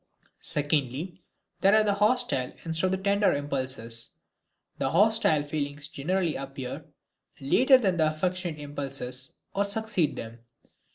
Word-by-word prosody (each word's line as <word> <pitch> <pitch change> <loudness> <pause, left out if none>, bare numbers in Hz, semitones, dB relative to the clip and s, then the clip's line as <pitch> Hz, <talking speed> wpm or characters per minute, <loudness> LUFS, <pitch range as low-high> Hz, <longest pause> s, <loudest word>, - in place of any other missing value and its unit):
Secondly, 150 +3 -1 0.4
there 195 +2 +5
are 215 - +5
the 205 -1 +2
hostile 210 - +1
instead 165 +2 0
of - - -1
the - - +1
tender 200 +1 +2
impulses. 130 -5 -3 0.7
The 135 - 0
hostile 200 -3 +3
feelings 145 -1 -4
generally 170 +4 -1
appear 135 -2 -6 0.5
later 255 - +5
than 190 -8 +1
the 155 -2 +3
affectionate 175 0 -2
impulses 135 -3 -4 0.2
or 200 - +1
succeed 200 -5 +1
them. 115 +1 -8
155 Hz, 125 wpm, -27 LUFS, 140-195 Hz, 0.7 s, there